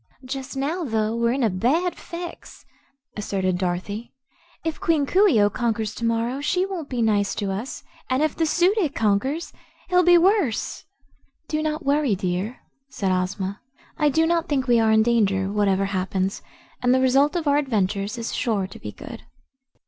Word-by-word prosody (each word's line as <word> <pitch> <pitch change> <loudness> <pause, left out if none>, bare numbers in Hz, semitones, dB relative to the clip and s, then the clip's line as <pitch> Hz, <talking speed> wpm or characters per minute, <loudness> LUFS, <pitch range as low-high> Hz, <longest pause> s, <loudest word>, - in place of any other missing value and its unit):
"Just 270 +1 -5
now, 310 +7 -1
though, 220 -4 0
we're 235 0 +1
in 265 +1 0
a 225 - +3
bad 285 - +1
fix," 345 0 -9 0.5
asserted 190 -3 -1
Dorothy. 190 +6 -3 0.5
"If 325 -1 -2
Queen 315 -4 +2
Coo 390 +8 +4
ee 275 - +4
oh 205 0 +4
conquers 220 -2 -1
to 235 - -8
morrow, 230 +4 0
she 360 +5 +1
won't 360 -7 -5
be 245 -3 -1
nice 205 -2 +1
to 200 -2 -2
us, 215 +8 -5 0.3
and 260 +3 +2
if 310 - 0
the 325 - +1
Su 355 +5 +3
dic 360 -10 -1
conquers, 225 +10 0 0.4
he'll 360 0 +5
be 355 0 +6
worse." 360 - +1 0.6
"Do 310 -1 -1
not 310 0 -2
worry, 280 -5 +2
dear," 185 +5 -3 0.3
said 195 -7 -1
Ozma, 190 +2 -2 0.3
"I 300 -2 +2
do 320 +3 +2
not 335 0 0
think 270 -3 +1
we 240 -2 +4
are 225 -1 +3
in 220 0 +5
danger, 200 -5 +1
whatever 195 -2 +2
happens, 190 0 -2 0.4
and 250 +1 +3
the - - +3
result 270 +5 +3
of 335 -3 -1
our 285 0 +4
adventure 210 -8 0
is 225 +3 -4
sure 210 -5 0
to 190 - -11
be - - -7
good." - - -10
240 Hz, 180 wpm, -23 LUFS, 205-305 Hz, 0.6 s, be